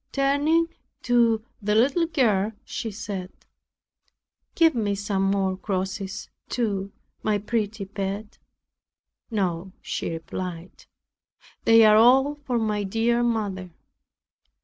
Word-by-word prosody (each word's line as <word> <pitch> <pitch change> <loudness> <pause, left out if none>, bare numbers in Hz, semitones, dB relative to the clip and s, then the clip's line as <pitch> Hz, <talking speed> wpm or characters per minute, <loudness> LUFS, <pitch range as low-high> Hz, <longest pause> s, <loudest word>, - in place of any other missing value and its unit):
Turning 285 +4 +2 0.4
to 230 -2 +3 0.2
the 210 +1 +1
little 280 +9 +3
girl, 225 - +1
she 225 - -4
said, 195 -3 -6 1.2
"Give 325 -1 +5
me 210 -4 0
some 195 -1 0
crosses, 190 +1 -3 0.2
too, 200 -5 -1 0.3
my 215 -1 +1
pretty 210 -1 -2
pet." 200 +2 -5 0.9
"No," 185 -4 -2
she - - -4
replied, 170 +1 -6 0.8
"they 225 0 +7
are 215 0 +7
all 265 +5 +5
for 280 -4 -3
my 215 -2 0
dear 225 +4 +1
mother." 205 -6 -1
210 Hz, 100 wpm, -25 LUFS, 195-235 Hz, 1.2 s, they